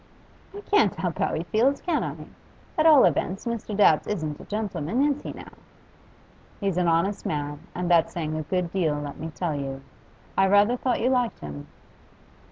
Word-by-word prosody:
'I 410 - -7
can't 405 - +2
help 175 -4 -3
how - - 0
he 160 - -2
feels, 225 - +1
can 340 -4 -1
I? - - -6 0.5
At 315 +1 +4
all 300 -4 +8
events, 185 - 0
Mr. 230 -3 -3
Dabbs 160 -7 +4
isn't 155 -8 -3
a - - -11
gentleman, 210 - -1
is 290 -1 +1
he, - - -6
now?' - - -11 1.1
'He's 195 -4 -1
an 180 -1 +2
honest 170 +5 +1
man, 145 -1 -3 0.2
and 180 0 -2
that's 165 -2 +4
saying 155 -2 -3
a 155 - -2
good 175 +2 -2
deal, 170 -6 +1
let 145 0 -6
me 160 +2 -5
tell 175 -4 -1
you. 135 -1 -5 0.5
I 195 - +4
rather 205 +4 +4
thought 250 0 -1
you 250 +3 +2
liked 245 -3 0
him. 70 -1 -8
180 Hz, 185 wpm, -25 LUFS, 155-225 Hz, 1.1 s, all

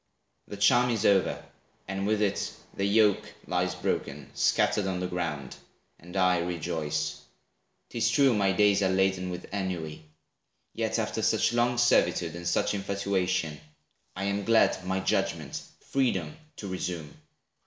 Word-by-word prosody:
The 100 - -7
charm 120 +5 +4
is 110 -3 0
over, 100 -2 +2 0.4
and, 95 +1 -2
with 105 0 +2
it, 100 -1 -1 0.2
the 100 - -1
yoke 105 0 +2
Lies 90 0 -1
broken, 75 -5 -3
scattered 100 -2 +2
on 95 -1 -2
the 90 - -2
ground; 85 -7 -4 0.4
and 90 +3 -8
I 90 -1 +3
Rejoice. 80 -3 -2 0.7
'Tis 115 -1 +1
true 130 +2 +4
my 100 -3 +2
days 100 0 +3
are 95 - +2
laden 95 -1 +1
with 90 0 -6
Ennui; 85 -6 -4 0.7
yet - - -1
after - - -2
such - - +2
long 120 +1 +2
servitude, 90 -8 +2
And 85 0 -5
such 85 - +1
infatuation, 95 -5 -1 0.5
I 95 - -4
am 100 +1 -1
glad 110 -3 +3
My 95 0 0
judgment, 95 -7 -1 0.2
freedom 95 - -1 0.2
to 100 - -7
resume. 90 -5 -4
95 Hz, 145 wpm, -28 LUFS, 85-100 Hz, 0.7 s, charm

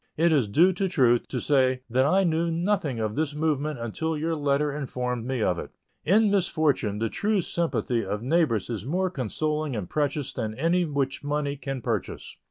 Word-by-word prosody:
It 170 +2 +3
is 140 -8 +3
due 170 - +4
to 190 +2 -1
truth 125 -9 +3
to 125 - -3
say 130 -2 +2
that 130 +3 +2
I 190 +5 +3
knew 170 -1 +1
nothing 165 - 0
of 110 -1 -1
this 150 +1 -2
movement 150 -1 -1
until 150 +8 -3
your 165 +2 -1
letter 145 0 0
informed 125 -4 -3
me 130 -4 -1
of 90 -3 +1
it. - - -6 0.3
In 205 +5 +4
misfortune 155 - +1
the 115 +2 0
true 210 - 0
sympathy 160 -9 -1
of 105 +3 -4
neighbors 130 - +1
is 110 - -4
more 180 +7 -1
consoling 150 - -2
and 100 -5 -4
precious 145 - -1
than 110 -4 -3
anything 165 +1 0
which 135 0 -1
money 145 0 -1
can 135 -3 -5
purchase. - - -3
145 Hz, 185 wpm, -26 LUFS, 125-165 Hz, 0.3 s, due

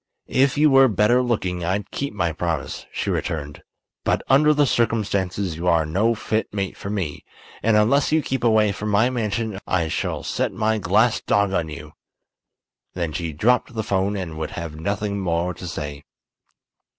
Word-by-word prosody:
"If 135 +2 +2
you 150 0 +5
were 135 0 +7
better 110 +3 +3
looking 95 -8 -1
I'd 95 +4 -2
keep 140 - -3
my 90 -6 -1
promise," 85 -2 -3
she - - -2
returned. 75 -2 -3 0.4
"But - - 0
under 150 +3 +5
the 150 -1 +3
circumstances 100 - 0
you 85 +2 -3
are 85 -2 +3
no 105 +9 +1
fit 110 0 -2
mate 100 -2 -3
for 100 - -7
me, 95 -8 -3 0.4
and 110 -1 +3
unless 120 +8 +3
you 155 -1 +3
keep 135 -1 -2
away 110 -3 +4
from 105 +1 -4
my 110 +5 +3
mansion 110 -3 -2
I 85 -3 0
shall - - -2
set - - -1
my 110 0 0
glass 105 +5 +2
dog 100 -1 +1
on 80 -4 0
you!" 75 - -9 1.0
Then 85 -3 -2
she 85 -1 -3
dropped 120 +9 +1
the 110 - -1
'phone 100 +1 0
and 80 -5 -5
would 80 - -3
have 85 -2 -5
nothing 100 +5 -2
more 90 -1 -1
to 90 - -8
say. 75 -3 -5
100 Hz, 175 wpm, -22 LUFS, 85-115 Hz, 1.0 s, were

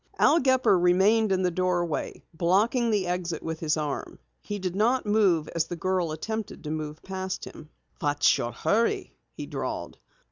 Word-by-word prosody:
Al 335 - +5
Gepper 260 - +3
remained 195 +5 +4
in 190 -1 +1
the 180 - +2
doorway, 175 -2 -1
blocking 205 +9 +2
the 205 -4 +1
exit 175 -2 -3
with 160 0 -4
his 155 -1 0
arm. 150 -2 -4 0.2
He 205 - -5
did 185 -2 -3
not 235 +5 +2
move 195 -7 +3
as 165 -2 0
the 175 - -5
girl 180 -1 -1
attempted 220 +7 -5
to 150 - -4
move 155 -1 -5
past 190 0 -4
him. 155 - -11 0.3
"What's 145 -1 +3
your 120 - -2
hurry?" 215 - 0 0.2
he - - -6
drawled. - - -5
180 Hz, 170 wpm, -27 LUFS, 160-210 Hz, 0.3 s, Al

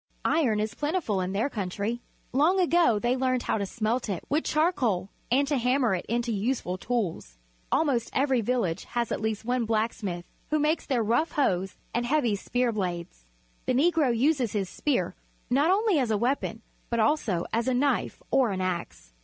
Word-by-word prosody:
Iron 255 -10 +2
is 215 +1 -1
plentiful 290 - -1
in 180 +1 -2
their 205 +7 +1
country. 210 0 -3 0.3
Long 320 +8 +3
ago 340 - +4
they 240 +4 +1
learned 255 -1 0
how - - 0
to 200 - -2
smelt 230 +3 -1
it 190 -4 -3
with 300 +3 +1
charcoal 255 - +1 0.2
and 275 +4 +3
to 285 -2 +1
hammer 250 -2 +2
it 180 - -3
into 235 +1 0
useful 205 -3 -1
tools. 180 - -3 0.3
Almost 265 -7 +1
every 265 -3 +2
village 205 -7 -1
has 240 -2 -2
at - - -2
least 220 0 -2
one 245 0 0
black 220 +1 +1
smith, 175 -5 -5 0.2
who 305 - +2
makes 305 +2 +1
their 250 -5 +1
rough 240 +10 +1
hoes 190 -9 0 0.2
and 240 +1 0
heavy 250 -6 +2
spear 245 +4 0
blades. 175 - -4 0.4
The - - +2
Negro 315 0 +3
uses 260 -3 +2
his 195 -3 -1
spear, 285 -4 0 0.4
not 285 +6 +3
only 400 -3 +3
as 250 -4 0
a 215 - +2
weapon, 235 -1 -1 0.3
but 235 - 0
also 220 - +1
as 230 +3 +1
a 260 - +2
knife 280 +3 0
or 260 -4 +4
an 190 -2 -2
axe. 170 - -4
240 Hz, 185 wpm, -27 LUFS, 205-275 Hz, 0.4 s, ago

